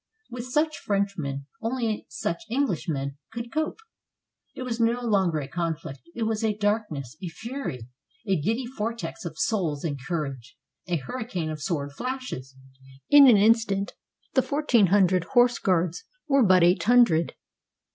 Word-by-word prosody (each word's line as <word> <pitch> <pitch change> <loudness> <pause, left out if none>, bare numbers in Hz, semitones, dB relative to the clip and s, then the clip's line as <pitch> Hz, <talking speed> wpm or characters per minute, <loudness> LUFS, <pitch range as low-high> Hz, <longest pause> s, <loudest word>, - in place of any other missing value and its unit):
With 245 0 -6
such 305 +4 0
Frenchmen 185 -9 -2 0.2
only 230 -2 -2
such 165 +4 -3
EngUshmen 160 - -1
could 235 0 -6
cope. 310 +1 -1 0.8
It 255 - -5
was 240 -2 -3
no 230 +1 +2
longer 190 -7 +2
a 140 -3 -3
conflict; 165 -3 -4 0.2
it 235 - -2
was 220 0 -1
a 215 -2 +1
darkness, 205 - -1
a 185 - -4
fury, 175 - -6 0.4
a 195 - +3
giddy 225 - -1
vortex 230 -3 -5
of 160 -2 -6
souls 180 -11 0
and 145 -5 -3
courage, 140 -6 -4 0.3
a 175 - 0
hurricane 180 - -4
of 155 -1 -6
sword 145 -2 -2
flashes. 250 - -5 0.6
In 290 -1 +10
an 235 -5 +8
instant 205 -2 +3 0.4
the 260 - +4
fourteen 260 -8 +3
hundred 185 -2 +4
horse 245 0 +5
guards 180 -2 0 0.2
were 275 -2 +4
but 185 -4 +5
eight 175 +2 +4
hundred. 220 -9 +4
200 Hz, 145 wpm, -26 LUFS, 160-235 Hz, 0.8 s, In